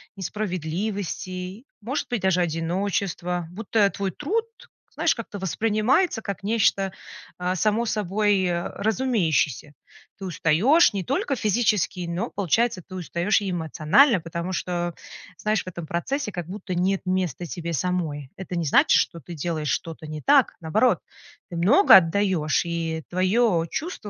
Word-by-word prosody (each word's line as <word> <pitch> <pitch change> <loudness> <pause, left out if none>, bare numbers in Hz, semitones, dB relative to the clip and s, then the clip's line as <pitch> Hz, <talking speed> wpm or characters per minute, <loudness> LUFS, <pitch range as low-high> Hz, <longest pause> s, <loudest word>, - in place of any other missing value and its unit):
несправедливости, 185 - -4 0.2
может 265 +7 -3
быть 240 -4 -1
даже 185 -1 +2
одиночества, 175 +1 -2
будто 210 0 +1
твой 190 +1 -3
труд, 440 +10 -1 0.5
знаешь, - - +1
как-то 215 -4 -7
воспринимается 220 - +1
как 200 -1 -5
нечто, 200 -3 +2 0.5
а, 180 +1 -1
само 215 +4 +1
собой, 205 -1 +1
э, 175 -1 -1
разумеющееся. 180 - 0 0.5
Ты 195 - -6
устаешь 185 - +4
не 195 -3 -4
только 275 0 -1
физически, 210 -5 +1
но, 185 +8 -2
получается, 205 +2 0
ты 185 - -13
устаешь 180 +4 0
и 200 -2 -4
эмоционально, 175 - +3
потому 170 +2 -5
что, 175 -1 -2 0.4
знаешь, 215 0 0
в - - -23
этом 170 -3 -7
процессе 235 - -2
как 175 -2 -5
будто 190 -1 -5
нет 190 +2 +1
места 180 -4 -1
тебе 170 0 -5
самой. 155 -4 -2
Это 180 -2 -5
не 165 - -1
значит, 145 - +5
что 170 - -2
ты 170 - -9
делаешь 155 -1 -3
что-то 160 -1 -3
не 155 -1 -6
так. 280 -2 +4
Наоборот, 210 +10 +2 0.5
ты 175 - -7
много 220 - +6
отдаешь, 180 -3 +3
и 165 -2 -3
твое 185 -1 +2
чувство 315 - -5
185 Hz, 140 wpm, -24 LUFS, 170-215 Hz, 0.5 s, много